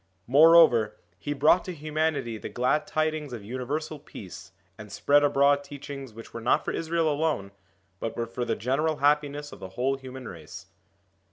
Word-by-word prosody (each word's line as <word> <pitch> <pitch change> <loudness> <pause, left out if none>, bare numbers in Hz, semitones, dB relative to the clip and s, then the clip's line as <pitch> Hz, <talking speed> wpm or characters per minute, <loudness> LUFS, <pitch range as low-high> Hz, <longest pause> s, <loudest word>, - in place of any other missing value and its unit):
More 155 +6 +7
over, 120 -11 +5 0.2
he 145 - -4
brought 150 +5 +4
to 185 - -5
humanity 155 -6 -2
the - - -6
glad 125 +5 0
tidings 155 -3 -1
of 115 -4 -7
universal 145 +6 -4
peace, 95 - -11 0.2
and 105 0 -11
spread 145 +7 +3
abroad 140 0 +3
teachings 140 -2 -8
which 115 +1 -12
were 115 - -6
not 115 - +2
for - - -1
Israel 165 0 0
alone, 150 -10 -1 0.5
but 115 - -4
were 115 - -1
for 120 +2 -4
the - - -1
general 150 +6 0
happiness 145 0 +1
of - - -11
the 95 - -8
whole 135 +2 +1
human 130 -2 -9
race. 85 +3 -10
140 Hz, 175 wpm, -27 LUFS, 115-155 Hz, 0.5 s, More